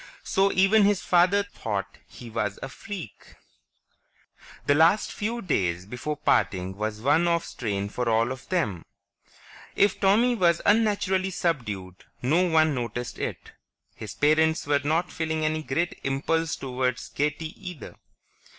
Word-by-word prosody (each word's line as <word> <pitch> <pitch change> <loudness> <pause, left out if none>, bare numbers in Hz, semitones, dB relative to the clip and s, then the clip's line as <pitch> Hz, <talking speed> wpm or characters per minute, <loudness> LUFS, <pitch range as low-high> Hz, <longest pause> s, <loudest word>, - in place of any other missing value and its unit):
So 195 +1 +2
even 195 +3 +5
his 205 -1 +2
father 185 +3 +4
thought 110 - -5
he 120 -2 -11
was 105 -3 -2
a 135 - -5
freak. 170 - -9 1.3
The 145 - +4
last 165 +8 +4
few 230 +3 -3
days 90 - 0
before 125 +8 -5
parting 95 -9 +1
was 105 +1 -4
one 150 +7 +3
of 170 0 +1
strain 100 -4 -3
for 120 +3 -2
all 115 +2 +2
of 130 0 -8
them. 110 - -1 0.9
If 200 -1 +2
Tommy 215 +6 +4
was 170 -7 +3
unnaturally 200 -3 +2
subdued, 105 - -3 0.2
no 155 +8 +3
one 160 -1 +4
noticed 120 -1 -4
it; - - -5 0.4
his 100 -2 -8
parents 160 +4 +2
were 145 0 +2
not 160 +5 0
feeling 160 -1 -2
any 155 0 0
great 165 +4 -2
impulse 160 +4 0
toward 125 -1 -2 0.2
gaiety 150 +2 -1 0.2
either. 175 -6 -10
155 Hz, 140 wpm, -26 LUFS, 115-180 Hz, 1.3 s, even